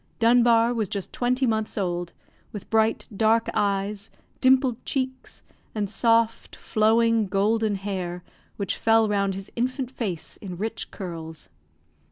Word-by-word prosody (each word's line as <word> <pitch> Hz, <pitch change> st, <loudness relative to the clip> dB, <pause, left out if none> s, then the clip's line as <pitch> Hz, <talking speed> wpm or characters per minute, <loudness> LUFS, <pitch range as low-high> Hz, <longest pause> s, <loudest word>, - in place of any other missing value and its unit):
Dunbar 235 Hz, 0 st, +4 dB
was 220 Hz, -5 st, -1 dB
just 200 Hz, -2 st, -5 dB
twenty 250 Hz, +2 st, +1 dB
months 220 Hz, -2 st, -1 dB
old, 175 Hz, -3 st, -2 dB, 0.4 s
with 205 Hz, -1 st, -9 dB
bright, 220 Hz, 0 st, +2 dB
dark 225 Hz, +2 st, +3 dB
eyes, 200 Hz, +1 st, -1 dB, 0.3 s
dimpled 260 Hz, -2 st, +3 dB
cheeks, 260 Hz, -1 st, -4 dB, 0.3 s
and 210 Hz, -2 st, -1 dB
soft, 230 Hz, +2 st, +1 dB
flowing, 225 Hz, 0 st, +2 dB
golden 210 Hz, +2 st, +1 dB
hair, 185 Hz, -3 st, -4 dB, 0.3 s
which 200 Hz, -2 st, -2 dB
fell 225 Hz, 0 st, +4 dB
round 200 Hz, -2 st, 0 dB
his 195 Hz, +1 st, -8 dB
infant 255 Hz, +1 st, -2 dB
face 200 Hz, -11 st, -4 dB
in 185 Hz, -3 st, -7 dB
rich 220 Hz, +3 st, -4 dB
curls. 160 Hz, -, -8 dB
220 Hz, 130 wpm, -25 LUFS, 195-230 Hz, 0.4 s, Dunbar